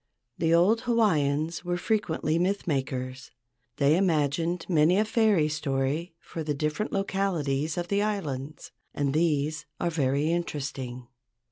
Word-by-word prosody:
The 165 -1 +2
old 185 +7 +4
Hawaiians 160 -9 +1
were 175 0 -1
frequently 170 -6 0
myth 195 +3 0
makers. 130 -4 -3 0.5
They 140 +2 +4
imagined 165 -1 +1
many 170 +1 +4
a 215 - +3
fairy 215 -8 +3
story 150 +2 -2
for 165 - -7
the 150 -1 -2
different 150 +8 -2
localities 170 -7 -1
of 175 0 -2
the 200 0 +2
islands, 155 -9 -3 0.2
and 140 -2 0
these 155 -1 0
are 170 - 0
very 145 0 +1
interesting. 135 -7 -4
160 Hz, 130 wpm, -27 LUFS, 140-180 Hz, 0.5 s, old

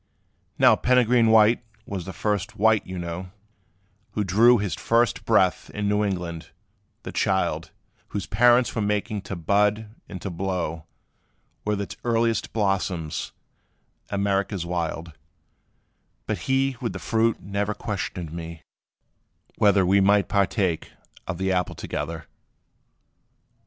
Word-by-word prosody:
Now - - +6
Peregrine 125 -2 +3
White 110 +1 +5 0.2
was 95 -4 -5
the 95 - -6
first 105 +3 -2
white, 110 +1 +3
you 95 0 -6
know, 85 +1 -5 0.8
Who 105 - 0
drew 115 +6 +5
his 100 -3 -2
first 115 +1 +1
breath 95 -5 +2
in 105 0 -1
New 105 +1 +2
England 90 -5 -3 0.5
the - - -6
child, - - 0 0.4
Whose 100 - -4
parents 120 +1 +4
were 115 - -1
making 105 0 -1
to 100 0 -6
bud 105 +5 +1 0.2
and 95 - -6
to 100 - -3
blow, 85 -3 -3 0.8
With 105 -1 0
its 100 - -5
earliest 115 -2 +1
blossoms, 95 -6 -1 0.8
America's 100 -2 -1
wild: 85 -1 -3 1.1
But - - -2
he 135 -1 +2
with 115 - -2
the - - -5
fruit 115 0 +1
never 100 +2 -2
questioned 90 -5 -4
me, 85 -1 -7 1.0
whether 100 -2 +4
We 100 +2 +4
might 100 +1 +4
partake 95 -4 0 0.4
of 95 - -3
the 95 +1 0
apple 90 -2 0
together. 80 +1 -5
100 Hz, 125 wpm, -24 LUFS, 90-110 Hz, 1.1 s, Now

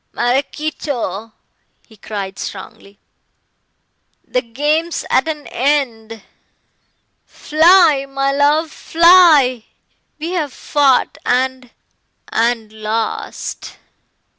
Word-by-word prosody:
"Maraquito," 250 - -3 0.5
he 220 - -19
cried 195 -2 -7
strongly, 200 +1 -9 1.3
"the 250 - 0
game's 295 +8 -2
at 260 - +2
an 300 -2 -4
end. 230 -6 -2 1.0
Fly, 315 -3 +3
my 275 0 -1
love, 295 +3 +1
fly. 320 -10 +4 0.5
We 320 +3 -5
have 310 -7 -2
fought 280 -4 +1
and 255 0 -1 0.6
and 225 -1 -1
lost. 220 +1 -5
270 Hz, 80 wpm, -17 LUFS, 225-305 Hz, 1.3 s, fly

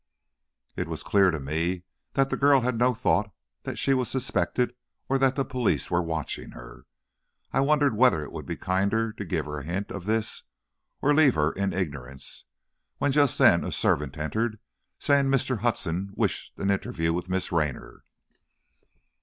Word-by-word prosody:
It - - -3
was - - -5
clear 100 -2 +4
to 80 -3 -2
me 80 +6 -2 0.3
that 135 0 +2
the - - +1
girl 140 -1 +5
had 125 0 0
no 125 0 +3
thought 105 -1 +1 0.3
that - - -5
she 135 - +2
was 130 -2 0
suspected, 125 -1 0 0.3
or 135 0 +1
that 135 -1 +3
the 135 - 0
police 130 -4 -1
were 85 0 +3
watching 80 -3 -4
her. - - -12 0.7
I - - +2
wondered 145 -2 +3
whether 115 -9 +4
it - - -9
would - - -7
be - - -3
kinder 100 +4 0
to 105 - -6
give 90 - -2
her 75 0 -5
a - - -8
hint 90 +7 -4
of 100 -3 -6
this 110 0 0 0.6
or 145 - +4
to 145 - +3
leave 145 -5 +5
her 75 +1 +2
in 100 0 -1
ignorance, 70 -7 -5 0.5
when 145 - +1
just 145 -2 +3
then - - +5
a - - -3
servant 70 -2 +1
entered, 110 +9 -1 0.4
saying 140 -1 +3
Mr. 130 -3 +1
Hudson 100 -4 -1
wished - - -2
an 100 - 0
interview 80 -4 -1
with 90 +1 -3
Miss 95 0 -1
Raynor. 75 -6 -2
100 Hz, 180 wpm, -26 LUFS, 85-130 Hz, 0.7 s, girl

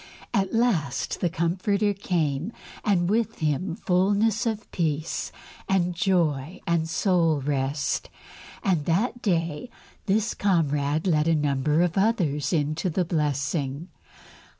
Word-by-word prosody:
At 195 -1 +1
last 180 - 0
the 175 - +1
Comforter 190 +5 0
came, 170 -3 -1 0.3
and 180 -4 +2
with 225 +2 0
Him 160 +3 -1
fullness 205 +6 +2
of 220 -1 -3
peace 155 -2 -2 0.4
and 180 -2 +2
joy 170 -4 0
and 165 -1 0
soul 165 -4 +2
rest, 140 +1 -1 0.5
and 175 -7 +1
that 220 +8 0
day 170 +1 -1 0.4
this 215 +3 +1
comrade 155 -5 +1
led 155 -4 +2
a 165 - +4
number 150 +2 +2
of 180 +2 0
others 180 -10 +1
into 155 +2 0
the 180 +2 0
blessing. 145 0 -1
170 Hz, 120 wpm, -25 LUFS, 150-195 Hz, 0.5 s, a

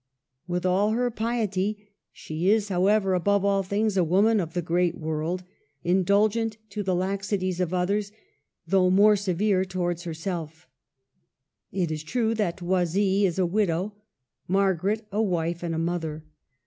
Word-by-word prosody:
Widi 180 +1 -1
all 195 +4 +2
her 245 +1 0
piety 210 -3 -2 0.2
she 160 +4 -3
is, 210 -1 +2
however, 195 +1 +2
above 200 +2 +2
all 200 -1 +2
things 200 +2 0
a 185 - +3
woman 200 +6 +3
of 165 -2 -4
the 175 - +1
great 175 +1 +1
world, 160 +2 -3 0.4
indulgent 205 +5 +2
to 210 - -3
the 190 -2 0
laxities 190 0 -1
of 180 -2 0
others, 200 +3 0 0.5
though 185 -2 +3
more 205 +3 +6
severe 195 0 +1
towards 175 -2 -2
herself 160 -2 -5 1.0
It 180 -4 -1
is 155 -1 -3
true 225 +7 0
that 195 -5 -2
Oisille 190 +3 +2
is 175 - -4
a 185 - +2
widow, 190 +1 0 0.5
Mar 195 +1 +3
garet 205 +6 -2
a 210 +2 0
wife 175 -4 -1
and 170 -2 -2
a - - -2
mother. 165 -2 -3
190 Hz, 150 wpm, -26 LUFS, 175-205 Hz, 1.0 s, more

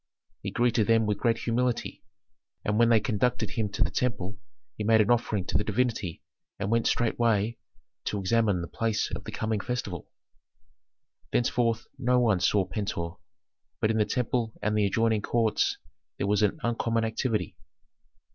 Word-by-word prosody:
He - - -3
greeted 120 -3 +2
them 115 -1 +4
with 105 -1 -1
great 115 -1 +2
humility, 120 +1 -1 0.6
and 105 +1 +1
when 115 0 +5
they 115 -2 +6
conducted 120 +4 0
him 110 -4 -1
to - - 0
the - - -1
temple 105 -5 -2 0.4
he 110 - -4
made 110 +1 +4
an 110 +2 +4
offering 110 -5 +1
to - - +1
the - - 0
divinity 115 -9 -1 0.3
and 100 +1 -2
went 115 0 +2
straightway 115 -1 +1 0.5
to 105 - -1
examine 100 -1 +2
the - - -5
place 115 -2 -1
of - - -6
the - - -6
coming 110 -1 -1
festival. 100 -7 -4 1.2
Thenceforth 115 -2 +1
no 125 0 +3
one 110 -6 +3
saw 100 +1 +2
Pentuer, 95 -3 -4 0.6
but 110 - +2
in 110 - 0
the 105 - +4
temple 120 -2 -1
and 105 +1 0
the 105 -1 +3
adjoining 110 +1 +1
courts 115 0 +1 0.4
there - - -1
was 105 +1 +2
an 105 +9 +1
uncommon 115 -1 0
activity. 110 -3 -1
110 Hz, 165 wpm, -28 LUFS, 105-115 Hz, 1.2 s, they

